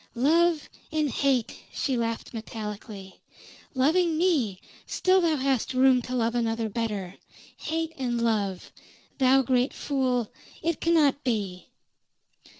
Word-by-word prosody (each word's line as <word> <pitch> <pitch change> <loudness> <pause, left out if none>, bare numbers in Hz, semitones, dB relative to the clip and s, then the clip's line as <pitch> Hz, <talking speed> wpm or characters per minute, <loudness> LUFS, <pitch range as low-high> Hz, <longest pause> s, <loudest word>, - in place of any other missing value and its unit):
"Love 320 +5 +3 0.2
and 305 -3 0
hate!" 265 -4 0
she 265 - -1
laughed 230 0 -3
metallically. 210 -3 -7 0.6
"Loving 320 +5 +2
me, 285 - +1 0.3
still 375 0 +3
thou 330 -3 +2
hast 265 -2 0
room 260 -1 +5
to 250 +2 -5
love 230 -1 +1
another 225 -2 -1
better. 205 -4 -3 0.4
Hate 325 +1 -3
and 240 -2 -1
love! 210 -5 -1 0.5
Thou 265 +1 +5
great 255 +1 +1
fool, 255 -5 -1 0.3
it 330 0 -1
cannot 305 -4 +3
be!" 205 -8 -2
255 Hz, 120 wpm, -26 LUFS, 225-300 Hz, 0.6 s, room